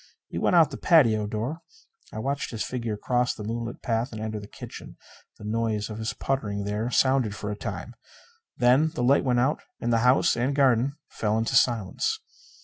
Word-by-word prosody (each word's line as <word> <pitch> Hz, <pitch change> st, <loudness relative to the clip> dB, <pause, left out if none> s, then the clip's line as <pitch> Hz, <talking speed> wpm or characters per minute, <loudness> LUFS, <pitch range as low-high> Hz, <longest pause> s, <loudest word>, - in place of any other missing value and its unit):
He -, -, -4 dB
went -, -, +2 dB
out 165 Hz, -3 st, +6 dB
the -, -, -6 dB
patio 115 Hz, -11 st, +4 dB
door. 115 Hz, +11 st, -3 dB, 0.5 s
I -, -, -8 dB
watched 140 Hz, +5 st, -2 dB
his 115 Hz, -3 st, -3 dB
figure 115 Hz, -4 st, -3 dB
cross 125 Hz, +3 st, 0 dB
the 105 Hz, -, -7 dB
moonlit 115 Hz, +2 st, -5 dB
path 115 Hz, +2 st, -1 dB
and 110 Hz, -, -7 dB
enter 110 Hz, 0 st, -4 dB
the 100 Hz, -, -10 dB
kitchen. -, -, -10 dB, 0.4 s
The -, -, -13 dB
noise 110 Hz, 0 st, -1 dB
of 110 Hz, -, -6 dB
his 110 Hz, 0 st, -2 dB
puttering 105 Hz, -7 st, -2 dB
there 105 Hz, +3 st, -2 dB
sounded 130 Hz, -4 st, +2 dB
for 105 Hz, 0 st, -4 dB
a -, -, -3 dB
time. 105 Hz, +2 st, -6 dB, 0.6 s
Then 130 Hz, +6 st, +4 dB
the 120 Hz, -, -1 dB
light 135 Hz, +3 st, +4 dB
went 125 Hz, -2 st, +2 dB
out 135 Hz, +5 st, +1 dB, 0.2 s
and 120 Hz, 0 st, 0 dB
the 115 Hz, -, +3 dB
house 125 Hz, +3 st, +4 dB
and 130 Hz, +4 st, 0 dB
garden 135 Hz, -1 st, +3 dB
fell 105 Hz, 0 st, -1 dB
into 115 Hz, 0 st, -1 dB
silence. 120 Hz, -, +1 dB
115 Hz, 195 wpm, -26 LUFS, 110-130 Hz, 0.6 s, out